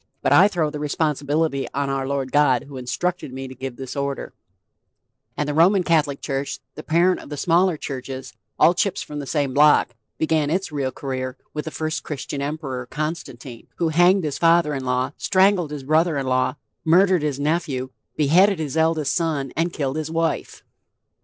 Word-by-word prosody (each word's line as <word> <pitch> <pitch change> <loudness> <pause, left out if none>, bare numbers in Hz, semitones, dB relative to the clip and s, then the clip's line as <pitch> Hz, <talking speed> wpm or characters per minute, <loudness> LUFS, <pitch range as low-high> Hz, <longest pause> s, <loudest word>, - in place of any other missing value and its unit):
But - - +3
I 195 - +7
throw 170 -7 -1
the 150 - -5
responsibility 150 -1 0
on 140 0 0
our 135 -1 -2
Lord 135 -2 -2
God 140 -5 +3
who 140 -1 -12
instructed 145 +5 -3
me 135 +1 -6
to 130 - -9
give 130 -1 -6
this 130 0 -7
order;" 140 0 -3 1.0
and 150 - -1
the 150 - -1
Roman 180 +5 +4
Catholic 150 -5 +1
church, 135 0 -3 0.2
the - - -8
parent 175 +3 +2
of - - -12
the 145 - -5
smaller 175 +2 +2
churches 130 -2 -6 0.2
all 170 - +5
chips 185 +1 -1
from 150 -4 -7
the 140 - -6
same 140 -3 -1
block 150 +2 +5 0.3
began 155 -2 +1
its 185 +2 -1
real 140 -3 -2
career 130 -1 -4 0.2
with 150 - -4
the - - -3
first 155 -1 -3
Christian 140 -1 -5
Emperor, 140 -4 -4
Constantine, 135 -5 -6
who 170 -2 0
hanged 175 +4 +4
his 150 -3 -3
father 165 -2 +4
in 135 -2 -4
law, 125 +1 0
strangled 190 -4 +3
his 145 -2 -6
brother 155 +2 +2
in 135 - -2
law, 130 +1 +1 0.3
murdered 180 +2 +4
his 145 -2 -2
nephew, 145 -4 -1 0.2
beheaded 180 +7 +4
his 155 -2 -4
eldest 160 -3 +1
son, 155 -6 -1
and 165 +2 0
killed 140 -3 -2
his 155 -1 -3
wife. 165 0 -2
150 Hz, 185 wpm, -22 LUFS, 135-165 Hz, 1.0 s, I